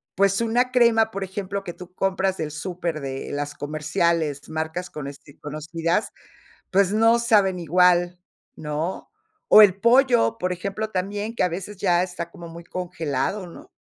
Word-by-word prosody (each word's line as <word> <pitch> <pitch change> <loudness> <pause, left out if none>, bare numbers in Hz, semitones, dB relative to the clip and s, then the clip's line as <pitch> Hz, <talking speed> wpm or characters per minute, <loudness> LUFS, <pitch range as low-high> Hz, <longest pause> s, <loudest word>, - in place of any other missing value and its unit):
pues, 195 +2 +2
una 245 +3 +1
crema, 230 -3 +4
por 195 0 -4
ejemplo, 195 +1 -4
que 175 -3 -6
tú 180 0 -12
compras 190 0 0
del 155 -1 -4
súper 170 0 -4
de 135 -1 -5
las 145 0 -4
comerciales, 150 0 -1
marcas 160 +3 -4
conoci 140 0 -9
conocidas, 165 +6 -2 0.6
pues, 195 0 +3
no 225 +2 +4
saben 205 -6 +3
igual, 175 +1 +3 0.4
¿no?, 155 +4 -4 0.4
o 215 - +10
el 195 -3 +6
pollo, 240 -1 +4
por 180 -4 -2
ejemplo, 200 +4 -4
también 205 +4 -3
que, - - -3
a 180 - +2
veces, 190 +4 -6
ya 180 -2 +2
está 175 -2 -5
como 170 0 -11
muy 170 +1 -10
congelado, 175 +1 -3
¿no? 170 - -13
180 Hz, 155 wpm, -23 LUFS, 160-200 Hz, 0.6 s, o